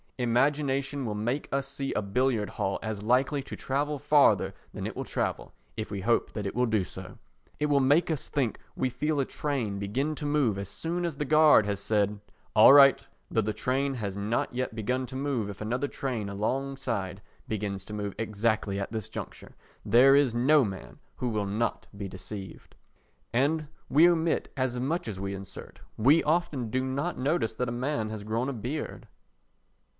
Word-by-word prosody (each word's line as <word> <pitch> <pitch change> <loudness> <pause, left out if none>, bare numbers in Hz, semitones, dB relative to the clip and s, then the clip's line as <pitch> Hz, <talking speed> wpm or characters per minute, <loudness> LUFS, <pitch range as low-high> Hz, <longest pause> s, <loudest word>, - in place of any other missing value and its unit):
Imagination 135 +2 +1
will 105 -2 -2
make 120 +7 -2
us 140 0 -1
see 135 0 -3
a - - 0
billiard 110 +1 0
hall 95 - -1
as 110 -2 -3
likely 130 +6 +2
to 135 - -8
travel 145 +2 -1
farther 145 +1 +4 0.2
than - - -5
it - - -4
will - - -3
travel, - - -3 0.3
if 110 - -4
we 100 -2 -4
hope 115 +4 +1
that 105 -2 -4
it 100 - -3
will 125 0 +2
do 110 -3 +1
so. 95 +1 -10 0.4
It 150 - +1
will 145 -1 +3
make 145 +7 +3
us 155 - -3
think 130 -6 -1 0.2
we 130 - 0
feel 145 +4 -1
a 135 - +2
train 125 -11 -2
begin 130 +10 -1
to 150 - -6
move 140 -9 +2
as 100 -1 -5
soon 170 - -3
as 165 -5 -3
the 150 - -1
guard 155 -6 +6
has 100 -1 -2
said 105 0 0 0.4
"All 110 +5 +9
right," 140 -1 +7 0.2
though 110 - +2
the 110 0 -2
train 135 +5 -1
has 100 -5 -4
not 105 +5 -1
yet 125 -2 -2
begun 125 +4 -1
to 130 - -9
move 130 -6 -1
if 100 - -8
another 125 +6 -1
train 120 -8 -3
alongside 110 -3 -2 0.3
begins 100 -3 -3
to 105 - -8
move 105 -2 -3
exactly 110 -2 0
at 100 - -4
this 110 -3 -4
juncture, - - -8 0.3
there 135 +4 +6
is 140 -5 +3
no 140 +4 +5
man 95 -4 -6 0.2
who 125 - -1
will 105 -3 -1
not 110 +3 -2
be 100 -1 -4
deceived. 95 0 -9 0.6
And 150 +5 +1 0.2
we 160 +5 +6
omit 170 -2 +1
as 130 -2 -1
much 150 +6 -1
as 100 -4 -5
we 100 0 -3
insert. 95 -1 -9 0.2
We 140 +9 +5
often 150 -7 0
do 130 +4 0
not 140 +7 -2
notice 135 -3 0
that 125 +1 -1
a - - -3
man 120 -2 -2
has 110 -1 -6
grown 115 +5 -1
a - - -3
beard. 125 +7 -5
125 Hz, 190 wpm, -28 LUFS, 105-140 Hz, 0.6 s, All